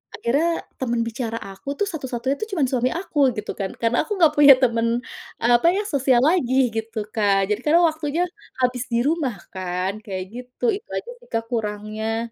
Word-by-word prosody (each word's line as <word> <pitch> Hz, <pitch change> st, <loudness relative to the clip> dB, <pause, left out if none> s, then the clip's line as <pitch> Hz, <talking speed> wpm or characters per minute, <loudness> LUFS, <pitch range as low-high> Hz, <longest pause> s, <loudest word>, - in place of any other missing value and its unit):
akhirnya 320 Hz, +8 st, 0 dB, 0.2 s
temen 235 Hz, -3 st, 0 dB
bicara 230 Hz, 0 st, -4 dB
aku 195 Hz, +8 st, -7 dB
tuh 410 Hz, -, 0 dB
satu-satunya 265 Hz, -4 st, -2 dB
tuh 435 Hz, -, -3 dB
cuman 315 Hz, -, +2 dB
suami 255 Hz, 0 st, +1 dB
aku 340 Hz, -3 st, -3 dB, 0.2 s
gitu 210 Hz, 0 st, -4 dB
kan? 195 Hz, -1 st, -3 dB
Karena 235 Hz, +5 st, 0 dB
aku 420 Hz, -, -1 dB
enggak 325 Hz, -5 st, +4 dB
punya 285 Hz, -1 st, +10 dB
temen 230 Hz, -2 st, +2 dB, 0.6 s
apa 240 Hz, +6 st, +4 dB
ya 410 Hz, -, 0 dB
sosial 270 Hz, -, +2 dB
lagi 285 Hz, -5 st, +2 dB, 0.2 s
gitu, 225 Hz, -1 st, -3 dB
Kak? 200 Hz, -2 st, +2 dB
Jadi 210 Hz, -, +1 dB
karena 330 Hz, +3 st, +5 dB
waktunya 315 Hz, +2 st, -1 dB, 0.4 s
habis 250 Hz, -1 st, +1 dB
di 235 Hz, +1 st, +2 dB
rumah 300 Hz, -7 st, 0 dB, 0.2 s
kan? 185 Hz, 0 st, -2 dB
Kayak 190 Hz, -2 st, -4 dB
gitu 250 Hz, +1 st, -11 dB
itu 420 Hz, -, -10 dB
aja 480 Hz, -, -4 dB
sih, 485 Hz, -, -20 dB
Kak, 225 Hz, -, 0 dB
kurangnya. 220 Hz, +1 st, -3 dB
240 Hz, 180 wpm, -23 LUFS, 220-295 Hz, 0.6 s, punya